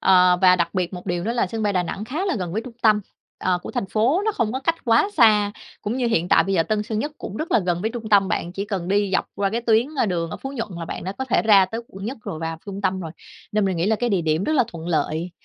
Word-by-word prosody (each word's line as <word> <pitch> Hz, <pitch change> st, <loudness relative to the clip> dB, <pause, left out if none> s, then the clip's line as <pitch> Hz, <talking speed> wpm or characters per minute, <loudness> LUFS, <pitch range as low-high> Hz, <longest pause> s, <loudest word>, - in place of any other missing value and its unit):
Ờ, 180 Hz, -1 st, +5 dB
và 185 Hz, 0 st, +7 dB
đặc 170 Hz, -1 st, -1 dB
biệt 180 Hz, -2 st, -1 dB
một 180 Hz, +1 st, -8 dB
điều 175 Hz, -1 st, -2 dB
nữa 230 Hz, -, 0 dB
là 240 Hz, -, +1 dB
sân 220 Hz, +4 st, -4 dB
bay 205 Hz, -1 st, +1 dB
Đà 180 Hz, -2 st, +1 dB
Nẵng 195 Hz, +4 st, -5 dB
khá 295 Hz, -, -3 dB
là 375 Hz, -, 0 dB
gần 180 Hz, -4 st, -4 dB
với 220 Hz, +4 st, -2 dB
trung 250 Hz, -, -9 dB
tâm, 215 Hz, -2 st, +5 dB, 0.4 s
ờ, 185 Hz, -1 st, +1 dB
của -, -, -6 dB
thành -, -, -2 dB
phố, 240 Hz, -, +2 dB
nó 435 Hz, -, +1 dB
không 230 Hz, -, -1 dB
có 260 Hz, -, -2 dB
cách 330 Hz, +5 st, +1 dB
quá 230 Hz, -, +4 dB
xa, 210 Hz, -5 st, +5 dB, 0.3 s
cũng 215 Hz, +3 st, -2 dB
như 255 Hz, -2 st, 0 dB
hiện 180 Hz, -7 st, +1 dB
tại -, -, +5 dB
bây 195 Hz, -, -1 dB
giờ 165 Hz, -, +4 dB
Tân 210 Hz, +4 st, -1 dB
Sơn 215 Hz, 0 st, -3 dB
Nhất 295 Hz, +7 st, -2 dB
cũng 205 Hz, -, -7 dB
rất 310 Hz, -, -4 dB
là -, -, +5 dB
gần 175 Hz, -3 st, -1 dB
với 220 Hz, -, 0 dB
trung 230 Hz, -2 st, -6 dB
tâm, 200 Hz, -2 st, +4 dB
bạn 175 Hz, -, -2 dB
chỉ 195 Hz, +2 st, -3 dB
cần 195 Hz, -4 st, -4 dB
đi 200 Hz, 0 st, +1 dB
dọc -, -, +1 dB
qua 200 Hz, -1 st, 0 dB
cái 230 Hz, +3 st, -1 dB
tuyến, 230 Hz, 0 st, +3 dB
ơ, 250 Hz, -, +2 dB
đường 170 Hz, -4 st, -2 dB
ở -, -, -5 dB
Phú 270 Hz, -, -7 dB
Nhuận 230 Hz, -5 st, -4 dB
là 165 Hz, -, -4 dB
bạn -, -, -6 dB
đã 190 Hz, -, -3 dB
có 265 Hz, +6 st, -4 dB
thể 235 Hz, -8 st, +1 dB
ra 200 Hz, -3 st, +6 dB
tới 225 Hz, +5 st, -5 dB
Quận 195 Hz, +1 st, -9 dB
Nhất 240 Hz, +5 st, -4 dB
rồi, 160 Hz, -, -5 dB
vào 165 Hz, 0 st, -4 dB
trung 200 Hz, 0 st, -6 dB
tâm 190 Hz, -1 st, 0 dB
rồi 165 Hz, -3 st, -6 dB, 0.4 s
nên 210 Hz, -1 st, +2 dB
mình 190 Hz, -2 st, 0 dB
nghĩ 170 Hz, +2 st, 0 dB
là 220 Hz, +1 st, +2 dB
cái 245 Hz, +3 st, -1 dB
địa 190 Hz, -4 st, +1 dB
điểm 160 Hz, +3 st, 0 dB
rất 310 Hz, -, 0 dB
là 270 Hz, -5 st, +4 dB
thuận 165 Hz, -1 st, -7 dB
lợi, 160 Hz, +2 st, -1 dB
200 Hz, 320 wpm, -23 LUFS, 180-230 Hz, 0.4 s, và